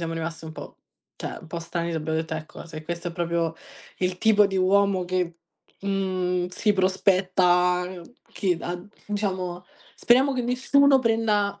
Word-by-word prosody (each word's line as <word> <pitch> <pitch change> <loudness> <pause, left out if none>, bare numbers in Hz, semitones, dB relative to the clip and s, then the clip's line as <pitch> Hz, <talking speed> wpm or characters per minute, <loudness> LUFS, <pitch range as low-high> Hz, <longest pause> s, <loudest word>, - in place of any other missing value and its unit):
siamo 165 -1 -3
rimaste 165 0 -5
un 160 - -7
po' - - -10 0.4
cioè - - -5
un - - -13
po' 170 - -4
stranite 170 0 -3
abbiamo 160 0 -2
detto: 160 0 -3
"Ecco, 155 -1 -8
se 155 -2 -8
questo 170 +2 -4
è - - -8
proprio 170 -1 -1 0.4
il 180 0 -1
tipo 210 -1 +5
di 195 -1 -3
uomo 190 0 +3
che, 180 -1 -2 0.4
mhmm, 185 -2 -1
si 210 +4 +1
prospetta 185 -2 +3 0.5
che 185 -4 0
ha" 175 0 -4 0.3
diciamo 185 -4 -2 0.3
speriamo 260 +4 +4
che 255 -2 -1
nessuno 270 +3 +4
prenda, 210 -4 +1
185 Hz, 155 wpm, -25 LUFS, 170-200 Hz, 0.5 s, tipo